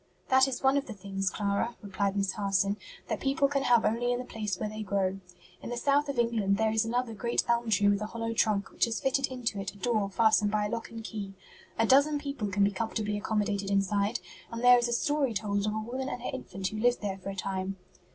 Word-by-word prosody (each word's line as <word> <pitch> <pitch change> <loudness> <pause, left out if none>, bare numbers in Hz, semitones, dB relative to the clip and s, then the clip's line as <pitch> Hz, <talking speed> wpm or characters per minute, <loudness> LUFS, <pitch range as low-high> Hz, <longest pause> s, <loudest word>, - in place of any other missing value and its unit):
"That 265 +1 +6
is 265 0 -4
one 265 +1 +4
of 280 - -1
the 225 - -5
things, 195 -1 -2
Clara," 205 +4 -1
replied 200 0 -1
Miss 195 -1 +1
Harson, 200 -1 0 0.3
"that - - -2
people 275 0 +2
can 275 0 0
have 240 -4 +4
only 240 +2 +1
in 245 - +1
the 250 - -5
place 210 -6 -3
where 215 - -2
they 215 +1 -6
grow. 195 -2 -1 0.4
In - - -7
the 240 - -3
South 285 +3 +2
of 275 - -3
England 225 -4 +2
there 220 0 +2
is 220 0 +2
another 235 +1 -1
great 235 +3 0
elm 235 -1 +1
tree 205 -1 +3
with 205 0 +3
a 210 - -2
hollow 230 0 -3
trunk 210 -3 +1
which - - +2
has 230 -1 -2
fitted 270 0 +1
into 245 -5 -3
it 195 0 -5
a - - -13
door 215 -2 0
fastened 215 0 +3
by 210 0 +1
a - - -2
lock 230 +1 -4
and 225 -1 -8
key. 200 -3 -6 0.4
A 225 - +3
dozen 285 +5 +5
people 280 -6 -4
can 200 +1 +1
be 200 - +3
comfortably 210 +1 -2
accommodated 205 -1 -1
inside, 200 +3 +1 0.3
and 230 +1 -5
there 245 0 +8
is 240 - 0
a - - -3
story 275 0 +1
told 205 0 0
of 210 - 0
a - - -1
woman 255 +4 -4
and 245 - -5
her - - -3
infant 195 -7 -4
who 215 - -6
lived 245 +2 +2
there 195 -2 -3
for 195 - -6
a 195 - -5
time." 190 0 -3
220 Hz, 250 wpm, -29 LUFS, 200-245 Hz, 0.4 s, there